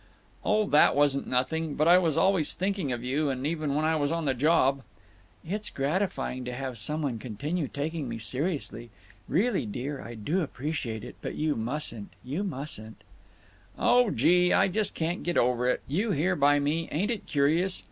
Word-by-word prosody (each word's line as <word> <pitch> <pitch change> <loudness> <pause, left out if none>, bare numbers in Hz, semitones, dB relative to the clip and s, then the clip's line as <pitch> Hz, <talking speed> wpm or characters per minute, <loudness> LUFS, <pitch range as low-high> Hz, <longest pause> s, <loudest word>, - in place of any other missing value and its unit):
"Oh, 215 0 +2
that 150 -5 +5
wasn't 145 -1 +2
nothing…. 150 +5 -1
But 155 - +2
I 175 +2 +8
was 165 -5 0
always 190 -5 +2
thinking 190 -6 -1
of 120 -1 -3
you, 140 +3 0
even 145 +2 -2
when 155 +1 +1
I 160 0 +2
was 145 -1 0
on 165 -1 -1
the 135 - +2
job—" 140 0 +3 0.7
"It's 210 +3 -3
gratifying 140 -3 -1
to 125 - -4
have 130 -2 -5
some 150 +8 -2
one 125 -6 -2
continue 140 - -3
taking 150 -1 -4
me 115 - -4
seriously…. 130 +1 -3 0.4
Really, 200 - +1
dear, 130 +7 -4
I 120 - -8
do 150 - -1
appreciate 135 -7 -4
it. 125 - -9
But - - -5
you 155 -1 0
mustn't—you 125 - -4
mustn't—" 135 - -6 0.7
"Oh, 245 -2 +4
gee! 180 -1 +3
I - - +4
just 210 +2 -1
can't 170 +2 -2
get 175 -1 -1
over 125 0 +2
it—you 175 - -1
here 175 +5 +1
by 145 -1 +4
me—ain't 165 +7 -1
it 230 - -4
curious! 160 +6 +1
150 Hz, 170 wpm, -28 LUFS, 130-175 Hz, 0.7 s, I